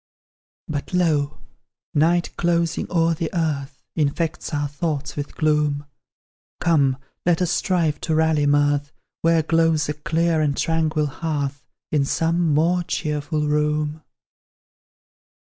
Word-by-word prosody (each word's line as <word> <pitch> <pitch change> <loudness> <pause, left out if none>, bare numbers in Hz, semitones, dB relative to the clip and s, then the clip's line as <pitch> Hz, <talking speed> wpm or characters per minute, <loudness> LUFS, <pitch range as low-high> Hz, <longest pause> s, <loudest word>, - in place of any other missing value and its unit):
But, 150 +4 -4
lo! 155 -5 +1 0.6
night, 170 +3 +2
closing 170 -1 0
o'er 165 -1 +3
the 160 0 -2
earth, 140 -5 -2
Infects 155 +1 -1
our 145 -1 -1
thoughts 145 0 -3
with 145 -1 -5
gloom; 150 -2 +1 0.7
Come, 140 -6 +3 0.3
let 175 -2 +2
us 180 -1 +1
strive 165 -7 +1
to 160 - 0
rally 160 -2 +3
mirth 145 0 +2 0.3
Where 165 -1 +3
glows 165 -2 +2
a - - 0
clear 160 +2 0
and 145 -2 0
tranquil 160 -2 +1
hearth 145 -3 -3 0.2
In 150 -2 +2
some 165 +2 +1
more 170 +4 +3
cheerful 150 -2 -2
room. 150 +1 0
155 Hz, 120 wpm, -22 LUFS, 145-165 Hz, 0.7 s, o'er